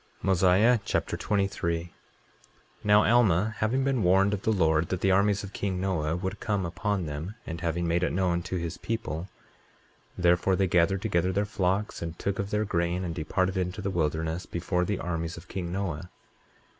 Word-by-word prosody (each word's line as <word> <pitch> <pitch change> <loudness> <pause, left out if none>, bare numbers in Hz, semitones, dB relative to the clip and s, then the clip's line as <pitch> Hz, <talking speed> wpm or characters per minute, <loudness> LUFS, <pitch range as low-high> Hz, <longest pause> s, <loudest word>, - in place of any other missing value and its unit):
Mosiah 95 +6 +4
Chapter - - -1
23 100 -4 0
23:1 85 +1 -10 0.9
Now 105 0 +5
Alma, 110 -3 +3
having 125 +5 +1
been 135 -3 +1
warned 95 +2 +4
of 100 - -2
the 110 - +1
Lord 80 -5 +2
that 95 0 -2
the 95 - +3
armies 100 +1 +3
of 100 0 -8
king 95 -2 -2
Noah 85 -5 0
would 95 +3 -4
come 100 -3 -1
upon 95 +2 -2
them, 80 +7 -5
and 80 0 -6
having 85 +1 -1
made 85 +1 +1
it 90 - +1
known 90 -2 +1
to 95 - -5
his 85 -1 -3
people, 95 -6 -4 0.9
therefore 90 +1 +3
they 95 - +2
gathered 90 +2 +2
together 90 -3 +1
their 100 +3 0
flocks, 100 +1 -1
and 85 0 -5
took 100 0 -2
of 100 0 -2
their 105 +1 0
grain, 85 -1 0
and 85 -2 -3
departed 95 +3 -1
into 90 +1 -2
the 100 -1 -2
wilderness 80 0 -1
before 90 +1 -1
the 105 +1 -1
armies 85 -2 -3
of 85 +2 -11
king 90 -3 -4
Noah. 90 -3 -3
95 Hz, 185 wpm, -28 LUFS, 85-100 Hz, 0.9 s, Now